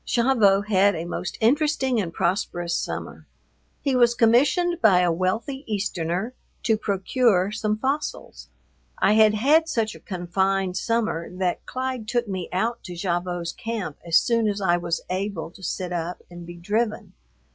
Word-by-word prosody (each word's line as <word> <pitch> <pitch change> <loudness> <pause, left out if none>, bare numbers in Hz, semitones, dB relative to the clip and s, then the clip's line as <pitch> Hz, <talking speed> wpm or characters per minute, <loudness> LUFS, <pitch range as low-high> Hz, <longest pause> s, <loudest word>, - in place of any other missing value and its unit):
Gavotte 215 -5 +3
had 200 -1 +3
a 165 +1 -4
most 175 +1 -5
interesting 265 -1 +2
and 170 -4 -4
prosperous 175 -1 -1
summer. - - -5 0.5
He 275 -3 0
was 240 -1 +4
commissioned 295 +10 +3
by 185 -4 +5
a 175 -1 +2
wealthy 220 - -2
Easterner 195 +1 -2 0.3
to 220 - +3
procure 200 -1 +1
some 215 0 -1
fossils. 275 +6 -3 0.5
I 205 - +3
had 215 -1 +5
had 305 +9 +3
such 225 -7 0
a - - -12
confined 190 +1 -1
summer 220 -6 -1
that 180 -1 -2
Clyde 255 -3 -4
took 240 0 0
me 185 -3 -4
out 225 +6 -1
to 180 -3 -7
Gavotte's 175 -1 -2
camp 220 -10 -5
as 170 -1 +4
soon 230 -2 +2
as 205 -1 -1
I 180 -3 +2
was 170 -1 -2
able 185 -3 -3
to 190 - -16
sit 180 0 -3
up 175 +1 -4
and 175 -1 -10
be 175 - -8
driven. 210 +6 -2
205 Hz, 155 wpm, -24 LUFS, 180-235 Hz, 0.5 s, by